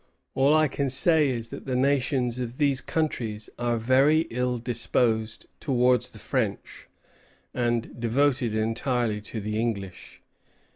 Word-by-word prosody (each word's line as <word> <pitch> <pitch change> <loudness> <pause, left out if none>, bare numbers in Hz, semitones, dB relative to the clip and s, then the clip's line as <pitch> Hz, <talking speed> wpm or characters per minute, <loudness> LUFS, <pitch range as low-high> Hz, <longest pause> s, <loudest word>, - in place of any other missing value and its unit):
All 140 +3 +3
I 155 0 +4
can 140 0 -2
say 150 +3 +4
is, 115 -3 -3
that - - -9
the 130 - -1
nations 130 -2 +1
of 125 0 -5
these 140 -3 +2
countries 115 -9 -3
are 120 -1 0
very 135 +7 +4
ill 125 +1 -1
disposed 115 -2 -1
towards 125 -3 +2
the - - -15
French, - - -3 0.7
and 120 -1 -2
devoted 125 -1 +1
entirely 115 0 -1
to 110 +2 -6
the 105 +1 -3
English." 100 -6 -5
125 Hz, 135 wpm, -26 LUFS, 115-135 Hz, 0.7 s, I